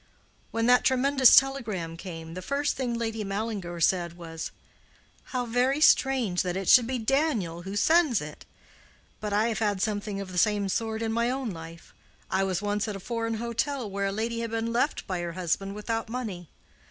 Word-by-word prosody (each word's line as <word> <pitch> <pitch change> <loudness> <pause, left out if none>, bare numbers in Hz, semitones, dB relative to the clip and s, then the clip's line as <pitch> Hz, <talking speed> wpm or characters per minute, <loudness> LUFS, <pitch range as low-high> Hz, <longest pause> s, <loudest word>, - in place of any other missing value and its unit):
When 230 0 -1
that 250 +1 +5
tremendous 265 0 +5
telegram 220 -12 +2
came, 165 -2 -8
the 185 - -6
first 280 +6 -1
thing 245 -3 -2
Lady 225 -2 -2
Mallinger 195 -4 -4
said 170 0 +2
was, 165 -2 -6 0.8
'How 250 -1 -2
very 250 +4 +1
strange 260 - +4
that 180 0 -2
it 195 -2 -4
should 245 -3 +7
be 260 0 -1
Daniel 225 - 0
who 190 +3 -6
sends 310 - +4
it!' 150 0 -8 0.8
But 210 -1 -4
I 215 +3 +2
have 225 - -2
had 205 -3 0
something 205 -1 -2
of 195 -2 -6
the 180 - 0
same 205 0 +2
sort 220 +2 -2
in 225 0 -1
my 235 +1 +1
own 255 -3 -2
life. 165 -1 -10 0.4
I 190 +1 +2
was 190 0 -1
once 205 +1 -1
at 210 - -3
a - - -6
foreign 230 +2 -2
hotel 235 +3 -2
where 200 0 -1
a - - -1
lady 230 +3 -2
had 230 0 -3
been 230 +1 -2
left 245 +6 0
by 185 -2 -3
her 170 -1 -4
husband 185 +3 -2
without 225 +2 -3
money. 210 -9 -5
215 Hz, 190 wpm, -27 LUFS, 185-240 Hz, 0.8 s, should